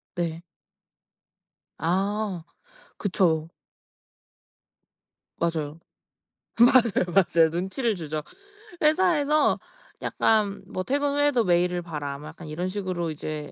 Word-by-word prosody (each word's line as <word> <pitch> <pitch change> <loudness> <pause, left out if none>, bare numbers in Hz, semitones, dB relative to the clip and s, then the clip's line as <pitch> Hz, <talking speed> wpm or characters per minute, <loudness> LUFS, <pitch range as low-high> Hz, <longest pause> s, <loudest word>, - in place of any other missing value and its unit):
네. 170 -1 -3 1.3
아 195 +1 -1 0.5
그쵸. 165 -5 +1 1.9
맞아요. 160 -2 -2 0.8
맞아요, 235 -5 +5
맞아요. 170 -4 +4
눈치를 190 +8 -1
주죠. 155 -3 -4 0.6
회사에서 305 -2 +3 0.4
약간 205 -3 +1
뭐 185 - -4
"퇴근 285 +6 0
후에도 290 -4 +3
메일을 175 -1 +2
봐라." 150 -5 -5
뭐 150 +2 -9
약간 160 +1 -11
이런 165 +4 -3
식으로 185 -4 -3
이제 150 -1 -6
180 Hz, 200 characters per minute, -26 LUFS, 160-220 Hz, 1.9 s, 맞아요